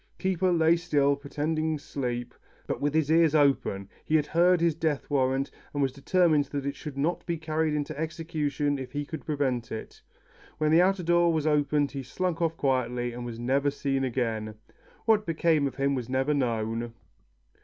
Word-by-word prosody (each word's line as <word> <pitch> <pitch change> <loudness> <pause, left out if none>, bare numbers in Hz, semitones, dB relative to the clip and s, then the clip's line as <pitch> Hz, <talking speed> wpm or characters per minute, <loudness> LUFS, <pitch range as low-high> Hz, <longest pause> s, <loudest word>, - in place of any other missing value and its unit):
Keeper 185 -1 +1
lay 165 0 +4
still, 145 -5 +2
pretending 155 +2 -2
sleep, 125 -4 -4 0.3
but - - -3
with 145 +1 +1
his 155 -1 +2
ears 160 -1 +4
open. 135 -9 +2 0.2
He 155 - 0
had 150 -2 +3
heard 175 +3 +3
his 170 -1 +2
death 150 -2 -1
warrant, 135 0 +1 0.2
and 145 - +1
was 135 - +1
determined 155 +2 +2
that 140 0 -5
it 140 0 -2
should 145 -2 -8
not 165 +5 0
be 170 -1 -1
carried 155 0 -1
into 150 +1 -3
execution 155 -3 -2
if 130 -1 -7
he 145 0 -2
could 160 -1 -8
prevent 135 -6 -1
it. 110 - -7 0.6
When 155 0 +1
the 165 +2 +6
outer 190 0 +2
door 175 0 +3
was 155 -2 0
opened, 145 -1 +2
he 140 - -4
slunk 175 +6 -3
off 165 -1 0
quietly, 125 -3 0
and 120 0 -6
was 115 -1 -6
never 135 +4 +1
seen 135 -1 -1
again. 115 -4 -2 0.5
What 220 -2 +4
became 160 -3 +2
of 135 - -6
him 140 0 +1
was 125 -3 -3
never 130 +3 +1
known. 115 -3 -1
145 Hz, 185 wpm, -27 LUFS, 135-160 Hz, 0.6 s, the